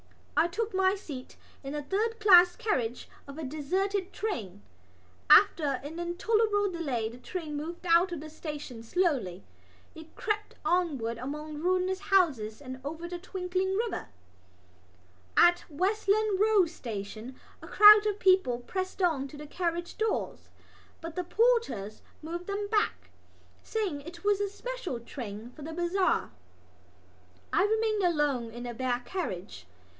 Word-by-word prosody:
I 335 - +4
took 430 +5 -3
my 380 +1 +3
seat 285 -10 -9 0.3
in 275 +2 -5
a 295 - -3
third 440 +8 -1
class 360 -4 +7
carriage 250 - -2 0.2
of 280 +1 -9
a 320 - -5
deserted 370 +7 -1
train. 210 - -4 0.7
After 285 -5 +6
an 315 +4 -7
intolerable 410 +3 +1
delay 275 -10 -2
the 240 +2 -12
train 310 +3 -5
moved 335 +4 -6
out 345 +2 +4
of 340 - -4
the 310 - -8
station 295 -6 -7
slowly. 235 - 0 0.5
It 320 -1 -13
crept 425 -1 -2
onward 275 -11 0
among 300 +4 -5
ruinous 370 +2 +1
houses 305 - +1
and 260 -2 -8
over 320 +4 -5
the 350 0 -6
twinkling 370 +1 -2
river. 455 +2 -2 1.3
At 350 0 +5
Westland 400 +4 +1
Row 425 -3 +5
Station 230 - -7 0.2
a - - -10
crowd 425 0 +8
of 415 -1 -1
people 370 -12 +3
pressed 370 +10 -4
to 300 -6 0
the 300 - -8
carriage 345 +2 -3
doors; 440 -1 -2 0.5
but 330 -1 -7
the 360 - -1
porters 380 - +1 0.2
moved 345 +3 -5
them 405 0 -2
back, 420 -1 0 0.5
saying 405 -10 -2
that 285 - -13
it 340 0 -10
was 410 -1 +2
a 405 - 0
special 410 - -5
train 230 -2 -8
for 295 - -14
the 320 +3 -6
bazaar. 350 +3 +1 1.2
I 400 -1 +4
remained 435 0 +1
alone 295 -9 +1
in 240 +2 -8
the 240 -1 -5
bare 245 0 -1
carriage. 185 - -5
345 Hz, 145 wpm, -29 LUFS, 275-390 Hz, 1.3 s, crowd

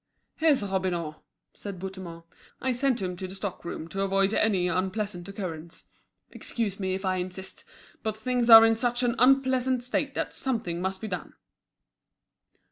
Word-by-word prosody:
"Here's 310 -8 +3
Robineau," 180 -5 -2 0.4
said 200 -2 -7
Bouthemont. 185 -3 -7 0.4
"I 260 - 0
sent 250 -3 0
him 180 -1 -3
to 185 0 -5
the 185 - -8
stock 195 -2 -5
room 165 -1 -6
to 195 - -3
avoid 195 +1 +2
any 195 -6 +2
unpleasant 185 +1 -2
occurrence. 170 -5 -7 0.5
Excuse 210 -5 -3
me 190 -1 -1
if 190 +1 -5
I 185 0 +1
insist, 185 +1 -5 0.4
but 220 -1 -3
things 245 +1 0
are 225 0 +11
in 225 0 +4
such 245 +2 0
an 240 -1 +2
unpleasant 260 -1 +3
state 280 +2 -1
that - - -2
something 220 -10 -2
must 190 +1 -3
be 220 - -4
done." 180 -4 -5
195 Hz, 160 wpm, -27 LUFS, 185-240 Hz, 0.5 s, are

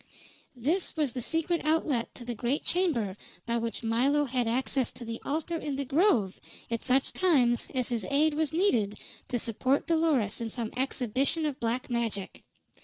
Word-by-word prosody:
This 315 +9 -1
was 295 -5 +1
the 250 - -4
secret 325 +6 0
outlet 305 -6 0
to 240 - -10
the 240 - -3
great 245 +5 -1
chamber 275 - +1 0.3
by 235 0 0
which 230 0 -3
Milo 265 +6 +2
had 250 -2 0
access 255 +1 0
to 240 - -9
the 230 0 -5
altar 320 +4 -2
in 295 -3 -3
the 280 0 -2
grove 270 - +2 0.3
at 230 - -1
such 265 +1 +2
times 260 -10 +3
as 255 -2 +1
his 235 -4 -1
aid 300 +2 +3
was 310 -1 0
needed 245 - +1 0.3
to 245 - -1
support 255 +4 +1
Dolores 310 - +1
in 230 - -2
some 225 -1 -4
exhibition 265 +4 0
of 290 -3 -2
black 235 +2 -1
magic. 225 -5 -2
255 Hz, 175 wpm, -29 LUFS, 235-305 Hz, 0.3 s, times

